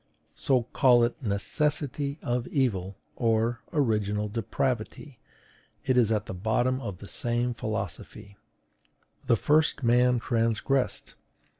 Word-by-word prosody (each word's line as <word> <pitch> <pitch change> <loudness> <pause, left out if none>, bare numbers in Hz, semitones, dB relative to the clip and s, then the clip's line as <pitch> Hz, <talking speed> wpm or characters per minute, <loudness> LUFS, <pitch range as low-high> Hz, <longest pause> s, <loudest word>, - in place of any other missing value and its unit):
So, 130 -3 +1
call 125 -3 +5
it 120 - -1
NECESSITY 140 +6 -1
OF 120 0 -1
EVIL 100 - -1 0.2
or 115 0 +1
ORIGINAL 105 -7 0
DEPRAVITY, 120 +3 -3 0.7
it 130 - +2
is 120 -3 +3
at 105 -2 0 0.2
bottom 120 +5 +1 0.2
the 100 - -11
same 120 +2 -1
philosophy. 110 -2 -6 0.9
"The - - +5
first 150 +2 +2
man 125 +1 +4
transgressed." 115 +3 -1
120 Hz, 105 wpm, -27 LUFS, 110-130 Hz, 0.9 s, call